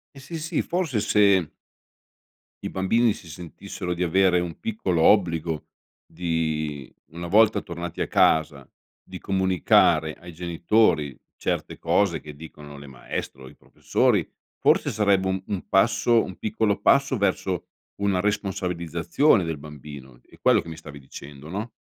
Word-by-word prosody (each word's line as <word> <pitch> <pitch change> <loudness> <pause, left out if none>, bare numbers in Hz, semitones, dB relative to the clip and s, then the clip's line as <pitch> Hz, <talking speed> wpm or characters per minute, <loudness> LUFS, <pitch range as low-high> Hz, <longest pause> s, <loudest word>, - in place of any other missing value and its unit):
Eh - - -11
sì, 145 +5 -7
sì, 165 +1 -1
forse 170 -10 -1
se 100 -5 +3 1.1
i - - -3
bambini 110 +5 +2
si 90 - -13
sentissero 90 +2 -6
di 90 - -1
avere 90 +1 +3
un 85 -2 -5
piccolo 95 -6 -1
obbligo 85 -4 +2 0.4
di 80 -4 -3
una 85 +2 -8
volta 110 +4 +4
tornati 85 0 -6
a - - 0
casa, 75 -4 +2 0.3
di - - -9
comunicare 90 -4 +2
ai 90 +2 -12
genitori 85 - +1 0.2
certe - - -3
cose 100 -4 +1
che 75 -1 -10
dicono 75 -2 -11
le 70 - -11
maestre 65 0 -7
o 65 - -10
i - - -17
professori, - - 0 0.3
forse - - +3
sarebbe 100 -3 +2
un 95 0 -1
un 100 -3 -4
passo 115 +3 +3
un 95 - -8
piccolo 105 -1 -1
passo 140 -1 +3
verso 95 -3 -1 0.3
una 100 -2 0
responsabilizzazione 90 - 0
del 80 -2 -3
bambino, 70 -3 -11
è - - -18
quello - - +4
che 85 - -11
mi 80 - -8
stavi 75 -3 -11
dicendo, 70 +2 -11
no? 105 +6 -5
90 Hz, 145 wpm, -24 LUFS, 80-100 Hz, 1.1 s, volta